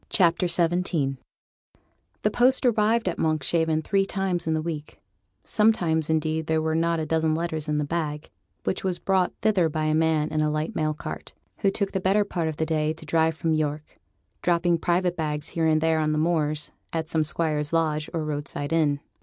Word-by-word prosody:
CHAPTER 175 -2 +3
XVII 170 0 +2
REJECTED 175 +2 -1
WARNINGS 135 -2 0 1.1
The 210 - +2
post 255 +3 +3
arrived 225 -1 +2
at 180 - -2
Monkshaven 160 +1 +1
three 195 +2 +1
times 185 -4 -1
in 160 - +1
the 155 - 0
week; 155 -3 -6 0.4
sometimes, 175 -8 +2
indeed, 160 0 0
there 160 0 +2
were 160 0 0
not 165 +1 +1
a 155 - -2
dozen 160 0 +1
letters 160 -2 -3
in 150 - +1
the 150 - +1
bag, 150 -1 -3 0.3
which - - -2
was 185 -2 0
brought 190 -2 +1
thither 195 -6 +3
by 155 0 -2
a 155 0 +1
man 160 -1 +2
in 155 0 0
a 155 - +2
light 155 +1 -2
mail 155 -1 0
cart, - - -7 0.3
who 200 - +3
took 195 0 -2
the 190 - -2
better 195 +3 +3
part 170 -5 -2
of 155 -2 -4
a 160 - +1
day 155 -1 0
to 160 0 -12
drive 160 +1 +2
from 165 -1 0
York; 155 -1 -3 0.4
dropping 175 -1 +2
private 175 +1 +1
bags 150 -3 -2
here 165 -1 0
and 155 0 +3
there 160 0 +2
on 155 0 +1
the - - 0
moors, 155 -2 0 0.2
at 160 -1 -2
some 160 -1 +1
squire's 150 -1 -1
lodge 155 -2 0
or 165 -3 -2
roadside 145 0 -3
inn. 145 -3 +2
160 Hz, 205 wpm, -25 LUFS, 155-175 Hz, 1.1 s, CHAPTER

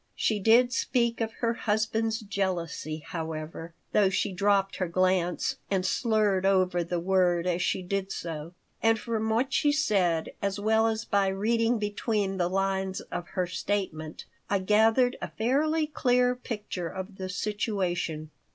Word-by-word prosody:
She 215 -2 +1
did 235 +5 +5
speak 235 -3 0
of 225 0 -1
her 230 - +2
husband's 225 +1 0
jealousy, 180 -6 -3
however 160 0 -6 0.2
(though 200 -2 +4
she 195 +1 -1
dropped 195 +1 +2
her 185 - -1
glance 185 0 +1
and 190 -2 0
slurred 210 -2 +1
over 185 -2 +2
the 170 +1 -2
word 180 -1 +2
as 180 -1 0
she 185 - 0
did 195 +1 -2
so); 165 0 -6 0.3
and 225 0 +4
from 220 0 -2
what 250 +5 +1
she 295 -2 +3
said, 195 - +1
as 200 0 -1
well 220 +2 +3
as 225 0 -2
by 200 -2 +2
reading 225 +4 +1
between 205 -1 -1
the 175 -1 +1
lines 190 0 -1
of 175 - -4
her 180 - +2
statement, 175 -4 -3 0.2
I 200 - +3
gathered 220 +6 +3
a - - -4
fairly 305 +7 +1
clear 250 -4 +2
picture 210 -7 -5
of 190 +3 -7
the 185 -1 -5
situation. 180 -6 -2
195 Hz, 150 wpm, -28 LUFS, 180-225 Hz, 0.3 s, did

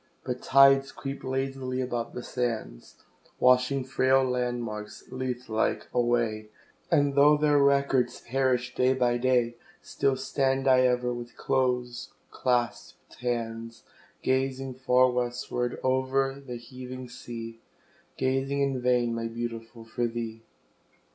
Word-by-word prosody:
But 125 -1 -4
tides 135 0 +5
creep 135 0 -6
lazily 130 -1 -2
about 120 -2 -3
the 125 - -5
sands, 115 - -4 0.4
Washing 125 +2 +4
frail 130 +1 +3
landmarks, 120 -4 -3
Lethe 130 -1 -4
like, 110 0 0
away, 120 -3 0 0.4
And 145 -1 +3
though 145 +2 +6
their 150 -1 +3
records 140 -3 +2
perish 125 -1 0
day 130 +1 +2
by 120 -2 +1
day, 120 -2 +1 0.3
Still 135 -1 0
stand 135 0 0
I 130 -1 +6
ever, 125 0 0
with 120 0 -8
close 125 -2 -1 0.2
claspèd 120 -2 -2
hands, 115 -2 -4 0.4
Gazing 130 0 0
far 130 0 +3
westward 125 0 -2
o'er 130 +1 +1
the 125 -3 -7
heaving 125 +1 -9
sea, 115 -1 -8 0.6
Gazing 135 +1 0
in 135 -2 0
vain, 125 -1 +2
my 115 0 -2
Beautiful, 115 0 -6
for 120 +1 -1
thee. 115 -1 -5
125 Hz, 120 wpm, -27 LUFS, 120-130 Hz, 0.6 s, though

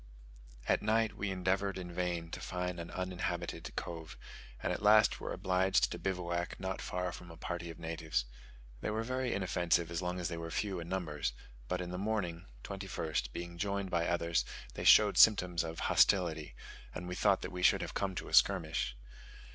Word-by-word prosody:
At - - +3
night 110 +1 +2
we 100 - -2
endeavoured 95 +1 0
in 90 -2 -6
vain 85 -2 -2
to - - -5
find 90 -1 -3
an 85 - -6
uninhabited 90 -1 -3
cove; 80 -2 -6 0.5
and - - +1
at - - -4
last 105 0 +6
were - - -5
obliged 95 0 +2
to - - -4
bivouac 85 -2 -2
not 95 0 -3
far 90 0 -2
from 90 0 -10
a 80 - -11
party 85 0 -4
of 85 - -8
natives. 80 -6 -2 0.5
They - - -2
were 110 +1 -1
very 130 +1 -1
inoffensive 85 -3 +1
as 85 +1 -2
long 90 0 -2
as 90 - -1
they 85 -1 -4
were 85 0 -5
few 95 +1 -2
in 85 0 -7
numbers, 80 -9 -2 0.3
but 90 +6 -1
in 90 0 -5
the 90 - -4
morning 95 -5 -2 0.2
(21st) 90 -9 -3
being 85 +4 -6
joined 100 -1 -1
by 85 -1 +1
others 85 -1 +1 0.3
they - - -5
showed 105 -2 +7
symptoms 90 -6 +6
of 80 0 -5
hostility, 85 -6 +3 0.4
and 90 - -5
we 90 - -4
thought 95 +1 +2
that - - -4
we 90 -1 -5
should 90 - +5
have - - -5
come 95 -2 -1
to - - -4
a - - -9
skirmish. - - +3
90 Hz, 190 wpm, -33 LUFS, 85-95 Hz, 0.5 s, showed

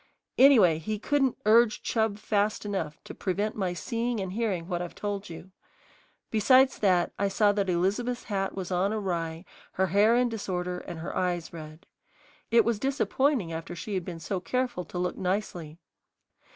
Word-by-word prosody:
Anyway, 220 - +6
he 215 +7 -3
couldn't 270 +3 +1
urge 220 +1 +4
Chub 220 -3 0
fast 210 0 0
enough 165 -7 -3
to - - -9
prevent 205 +3 -2
my 190 -4 -1
seeing 230 +5 -2
and 190 -1 -4
hearing 200 -7 -1
what 175 -2 -2
I've 175 - -6
told 205 -1 -4
you. 175 +3 -10 0.8
Besides 255 +5 +4
that, 180 -4 +2
I 200 - +2
saw 205 +1 +3
that 200 -2 -1
Elizabeth's 205 +8 0
hat 195 -2 -2
was 190 -1 -5
on 185 +3 +1
awry, 170 -5 -3 0.3
her 190 - +1
hair 205 +5 +4
in 250 0 +3
disorder, 180 -5 -3
and 165 -2 -8
her 170 - -5
eyes 175 -2 -1
red. 155 0 -10 0.6
It 230 0 +5
was 230 -2 0
disappointing 270 - 0
after 165 +2 -6
she 200 +5 -6
had 185 -2 -1
been 170 -1 -7
so 185 +4 -3
careful 245 -2 -2
to - - -8
look 180 0 -2
nicely. 180 -4 -3
195 Hz, 170 wpm, -28 LUFS, 175-220 Hz, 0.8 s, Anyway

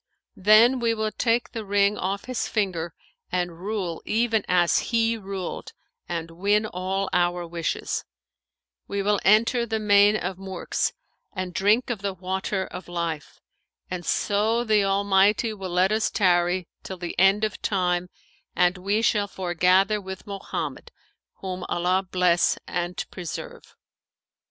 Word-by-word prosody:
Then 220 +6 +6
we 230 -1 +1
will 215 0 -1
take 230 +3 0
the 225 -2 -5
ring 200 0 +2
off 195 0 -3
his 255 -2 -2
finger 175 -6 -2 0.4
and 175 -2 -2
rule 190 -4 -3
even 225 -1 +1
as 175 -1 +3
he 230 -1 +2
ruled 195 -4 -6 0.4
and 165 -1 -4
win 205 +5 +1
all 190 0 -2
our 175 0 +1
wishes; 170 -1 -3 0.8
we 200 0 -2
will 205 0 +2
enter 230 +4 +4
the 225 -1 -2
Main 205 0 +5
of 185 -1 -4
Murks[FN#518] 190 -1 -2 0.4
and 185 -2 -4
drink 210 +7 +2
of 220 -5 -4
the 200 -1 -3
Water 190 +1 -2
of 185 - -9
Life, 170 -3 -4 0.5
and 180 -1 -3
so 215 +6 +1
the 215 -3 +3
Almighty 200 +3 +3
will 195 -3 -6
let 180 +2 +2
us 220 +1 +1
tarry 175 -2 +2
till 190 - -7
the 175 -1 -5
End 195 +3 +4
of 215 -2 -2
Time 180 -2 0 0.5
and 180 +1 +2
we 205 +4 0
shall 205 -2 +2
foregather 190 +2 +2
with 190 0 -8
Mohammed, 200 -1 -5 0.5
whom 185 -1 -5
Allah 180 +2 +1
bless 180 -1 +3
and 175 0 -3
preserve!' 175 -4 -8
195 Hz, 140 wpm, -25 LUFS, 180-210 Hz, 0.8 s, Then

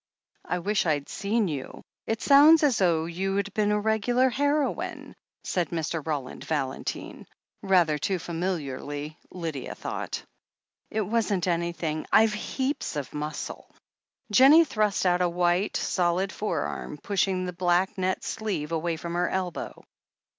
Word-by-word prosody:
"I 180 - -1
wish 205 +3 0
Fd 145 -3 0
seen 210 +1 0
you 140 -5 -6
— - - -65
it 225 0 -2
sounds 300 +3 +7
as 270 -6 +3
though 170 -4 +2
you'd 195 +3 -2
been 210 -1 +1
a 210 - +2
regular 230 +4 +2
heroine," 285 +2 -1 0.3
said 180 -2 -1
Mr. 165 -1 -2
Roland 145 -5 -4
Valentine, 135 -4 -4 0.3
rather 175 -6 +3
too 190 +5 0
familiarly, 155 -4 -4
Lydia 165 -7 -5
thought. - - -5 0.7
"It 215 - -1
wasn't 205 -3 0
anything. 170 -2 -1
I've 220 -1 +5
heaps 260 - -2
of 145 -3 -4
muscle." 150 0 -5 0.6
Jennie 280 +9 +8
thrust 210 -7 0
out 180 0 +3
a 180 - +3
white, 175 +3 +1
solid 180 +1 0
forearm, 165 -6 -3
pushing 190 +1 0
the 180 - -4
black 180 +2 +1
net 185 0 -1
sleeve 195 -8 -3
away 165 +1 -1
from 170 +1 -5
her 175 +1 +1
elbow. 185 -3 -4
180 Hz, 140 wpm, -27 LUFS, 165-210 Hz, 0.7 s, Jennie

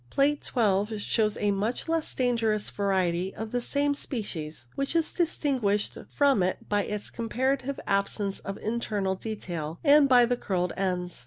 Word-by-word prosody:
Plate 290 +1 +2
12 210 -2 +1
shows 215 0 +1
a 205 -1 +1
much 210 +9 -2
less 325 -1 0
dangerous 230 -4 +1
variety 190 -2 0
of 220 0 -5
the 245 - 0
same 285 +3 +1
species, 160 - -5
which 275 +4 -2
is 330 -1 +1
distinguished 260 - 0 0.2
from 280 -7 +3
it 185 +1 -1
by 205 -1 +1
the 210 0 -3
comparative 260 +4 -1
absence 200 0 0
of 195 - -6
internal 210 -4 -1
detail 175 -6 -5
and 290 -2 +6
by 245 -2 +7
the 245 +1 0
curled 180 -5 -1
ends. 180 -4 -2
215 Hz, 155 wpm, -28 LUFS, 195-260 Hz, 0.2 s, by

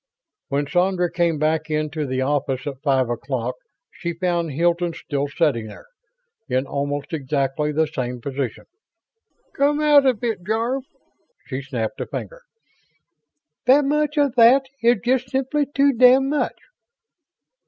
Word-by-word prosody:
When 140 +1 -1
Sandra 180 +2 +1
came 170 -2 +1
back 155 +1 0
into 155 -1 -2
the 130 0 -1
office 135 -1 -1
at 140 -2 -6
five 135 -4 +2
o'clock 120 +1 -3 0.4
she 170 -1 -5
found 170 -1 -1
Hilton 170 +3 +1
still 145 -1 -3
sitting 140 -7 0
there, - - -12 0.6
in 130 +1 0
almost 145 +2 -3
exactly 140 0 -1
the 160 +2 +2
same 125 -5 -4
position. 135 -2 -4 0.9
"Come 290 +1 +2
out 295 -2 +5
of 245 -4 +1
it, 220 -6 -2
Jarve!" 230 +6 -1 0.6
She 130 -2 -4
snapped 125 -5 -4
a - - -4
finger. - - -7 1.3
"That 275 +3 +6
much 300 +1 0
of 285 -4 +3
that 250 +4 +6 0.2
is 235 -2 +3
just 255 0 +1
simply 270 +2 0
too 280 0 +2
damned 255 +3 +5
much." 300 - -1
165 Hz, 140 wpm, -22 LUFS, -, 1.3 s, That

